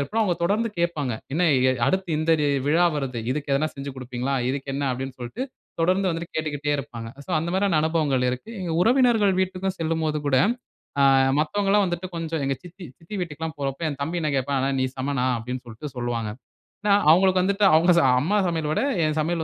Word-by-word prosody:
ஏற்படும். 220 Hz, +11 st, 0 dB
அவுங்க 180 Hz, -5 st, +1 dB
தொடர்ந்து 215 Hz, +6 st, +1 dB
கேட்பாங்க, 155 Hz, -7 st, 0 dB, 0.2 s
"என்ன 165 Hz, +5 st, +1 dB, 0.3 s
அ -, -, +4 dB
அடுத்து 190 Hz, -2 st, 0 dB
இந்த 160 Hz, +1 st, +2 dB
டே 145 Hz, -, +2 dB, 0.2 s
விழா 170 Hz, +4 st, +4 dB
வருது, 130 Hz, -5 st, -3 dB
இதுக்கு 145 Hz, +1 st, -3 dB
எதுனா 155 Hz, +3 st, +1 dB
செஞ்சி 140 Hz, 0 st, -6 dB
குடுப்பீர்களா? 130 Hz, +1 st, -3 dB, 0.2 s
இதுக்கு 135 Hz, 0 st, -4 dB
என்ன?" 140 Hz, 0 st, -1 dB
அப்படின்னு 130 Hz, +1 st, -4 dB
சொல்ட்டு 125 Hz, -, -5 dB, 0.4 s
தொடர்ந்து 185 Hz, +3 st, +2 dB
வந்துட்டு 165 Hz, +1 st, -5 dB
கேட்டுக்கிட்டே 145 Hz, -2 st, -2 dB
இருப்பாங்க. 120 Hz, -5 st, -6 dB, 0.2 s
சோ -, -, -8 dB
அந்த 170 Hz, -, -3 dB
மாதிரியான 190 Hz, -4 st, +2 dB
அனுபவங்கள் 150 Hz, -5 st, +1 dB
இருக்கு. 125 Hz, -, -6 dB
எங்க 170 Hz, -3 st, -3 dB
உறவினர்கள் 235 Hz, -3 st, +4 dB
வீட்டுக்கும் 190 Hz, 0 st, -2 dB
செல்லும்போது 160 Hz, -1 st, 0 dB
கூட, 130 Hz, -2 st, +3 dB, 0.6 s
ஆ -, -, +5 dB, 0.4 s
மத்தவங்கள்லாம் 200 Hz, +6 st, +2 dB
வந்துட்டு 175 Hz, +1 st, -3 dB
கொஞ்சம் 165 Hz, -2 st, -3 dB
எங்க 135 Hz, 0 st, 0 dB
சித்தி, 180 Hz, +1 st, -11 dB
சித்தி 170 Hz, +6 st, -10 dB
வீட்டுக்குலாம் 160 Hz, -1 st, -5 dB
போறப்போ 135 Hz, +2 st, -3 dB
என் 145 Hz, -2 st, -5 dB
தம்பி 170 Hz, +4 st, -2 dB
என்ன 155 Hz, -, 0 dB
கேட்பான், 135 Hz, +1 st, 0 dB
"அண்ணே 135 Hz, +1 st, 0 dB
நீ -, -, +2 dB
சமண்ணா" 130 Hz, -1 st, -1 dB
அப்பிடின்னு 125 Hz, +2 st, -5 dB
சொல்லிட்டு 115 Hz, +6 st, -7 dB
சொல்வாங்க. 120 Hz, -3 st, -2 dB, 0.5 s
ஏன்னா, 205 Hz, -1 st, +3 dB, 0.2 s
அவுங்களுக்கு 185 Hz, +1 st, +4 dB
வந்துட்டு 200 Hz, +1 st, +2 dB
அவுங்க 175 Hz, +3 st, +5 dB, 0.3 s
அம்மா 200 Hz, +8 st, +1 dB
சமையல 160 Hz, -3 st, -1 dB
விட -, -, +1 dB, 0.2 s
என் 155 Hz, 0 st, -1 dB
சமையல் 165 Hz, +1 st, 0 dB
155 Hz, 190 wpm, -24 LUFS, 135-180 Hz, 0.6 s, ஆ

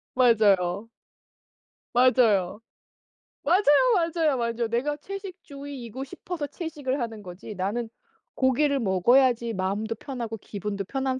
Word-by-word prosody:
맞아요. 205 Hz, -4 st, +3 dB, 1.0 s
맞아요. 230 Hz, -6 st, +3 dB, 0.8 s
맞아요, 360 Hz, +7 st, +3 dB, 0.3 s
맞아요, 330 Hz, -5 st, +1 dB
맞아요. 235 Hz, 0 st, -1 dB
내가 270 Hz, +6 st, -1 dB
채식주의이고 285 Hz, -, -8 dB
싶어서 310 Hz, +2 st, -6 dB
채식을 290 Hz, -5 st, -4 dB
하는 225 Hz, -2 st, -4 dB
거지. 180 Hz, +4 st, -9 dB
나는 210 Hz, +5 st, -2 dB, 0.5 s
고기를 275 Hz, +2 st, +2 dB
먹어야지 235 Hz, +4 st, +3 dB
마음도 205 Hz, +4 st, -2 dB
편하고 235 Hz, -3 st, -6 dB
기분도 200 Hz, 0 st, -5 dB
편한 265 Hz, +2 st, -2 dB
240 Hz, 285 characters per minute, -26 LUFS, 210-280 Hz, 1.0 s, 맞아요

